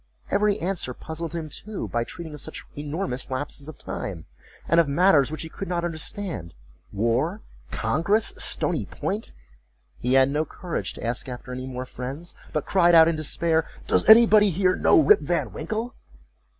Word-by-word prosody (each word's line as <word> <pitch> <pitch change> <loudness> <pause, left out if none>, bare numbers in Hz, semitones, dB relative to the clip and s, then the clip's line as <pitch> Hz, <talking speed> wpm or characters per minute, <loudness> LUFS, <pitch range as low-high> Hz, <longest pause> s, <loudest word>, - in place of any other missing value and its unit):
Every 205 0 +2
answer 175 - -3
puzzled 160 0 -6
him 165 -2 -4
too, 210 +7 -5
by 120 0 -1
treating 170 -1 -8
of 150 - -9
such - - -7
enormous 145 -3 -4
lapses 140 +2 -4
of 155 - -10
time, 90 -5 -6 0.4
and 165 - +4
of 165 - +4
matters 145 -2 +4
which 155 +1 -4
he - - -6
could 195 - -7
not 175 -1 -1
understand: 165 - -4 0.4
war—congress—Stony 155 - 0
Point;—he - - -6
had 135 +1 +5
no 150 +2 +1
courage 170 +2 -5
to - - -10
ask 120 +2 -3
after 125 0 -7
any 130 +1 -5
more 130 0 -5
friends, 135 +7 -7 0.2
but 150 - -2
cried 175 -3 +4
out 160 -1 +8
in 165 - +1
despair, 160 +1 0 0.2
"Does - - +1
nobody 220 -2 +8
here 185 +1 +2
know - - +5
Rip 415 +6 +6
Van - - -1
Winkle?" 225 +2 -4
160 Hz, 160 wpm, -25 LUFS, 130-185 Hz, 0.4 s, out